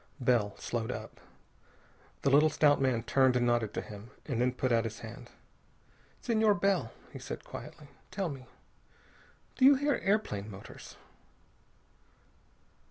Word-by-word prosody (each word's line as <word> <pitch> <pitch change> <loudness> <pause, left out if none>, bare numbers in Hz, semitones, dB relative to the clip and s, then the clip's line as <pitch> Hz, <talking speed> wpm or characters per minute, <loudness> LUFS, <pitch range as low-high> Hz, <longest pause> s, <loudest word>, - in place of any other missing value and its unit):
Bell 120 -5 +1
slowed 115 -2 -3
up. - - -8 1.0
The 140 - +3
little 150 +3 +6
stout 145 -2 +3
man 125 -4 +1
turned 130 -2 +3
and 120 -1 +2
nodded 120 -3 +1
to - - -1
him, 105 +2 -10 0.2
and 125 -5 -1
then 125 0 +3
put 130 0 -1
out 115 -1 +3
his 110 -1 -6
hand. - - -9 0.9
"Senor 220 -3 +3
Bell," 200 -1 +1 0.2
he - - -7
said - - -7
quietly, - - -9 0.2
"tell 195 -2 -2
me. 130 -3 -9 1.1
Do 260 - 0
you 280 +1 +9
hear 285 +2 +1
airplane 190 - 0
motors?" 95 -1 -11
130 Hz, 140 wpm, -31 LUFS, -, 1.1 s, you